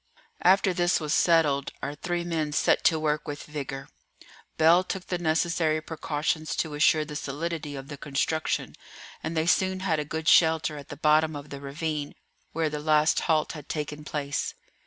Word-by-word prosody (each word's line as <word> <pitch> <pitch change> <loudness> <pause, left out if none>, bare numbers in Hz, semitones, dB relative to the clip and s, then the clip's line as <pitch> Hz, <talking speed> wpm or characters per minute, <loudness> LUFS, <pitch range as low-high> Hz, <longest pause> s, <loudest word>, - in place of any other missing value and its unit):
After 190 0 +4
this 175 0 +2
was 150 -1 -2
settled, 150 -5 +3
our 145 - -2
three 175 +3 -3
men 160 -3 -2
set - - +2
to 160 - +5
work 155 0 -1
with 145 -1 -5
vigour. 140 -2 -6 0.7
Bell 165 +3 +5
took 185 0 -5
the 180 - -3
necessary 160 -1 +1
precautions 155 0 -2
to 155 - -2
assure 155 +1 +3
the 150 0 -8
solidity 150 +1 -4
of 135 0 -7
the 145 - -8
construction, 150 +3 -1 0.5
and 160 +1 -4
they 160 - +2
soon 185 +2 +2
had 165 -5 +1
a - - -1
good 160 +2 -5
shelter 160 -2 +4
at 145 -2 -10
the 145 - -7
bottom 155 +1 +3
of 145 0 -8
the 140 -1 -7
ravine 150 +1 -4 0.4
where 160 0 0
the 150 - -3
last 155 0 +3
halt 155 -1 +1
had 150 -2 -10
taken 150 -1 -4
place. 145 -2 -3
155 Hz, 180 wpm, -27 LUFS, 150-165 Hz, 0.7 s, to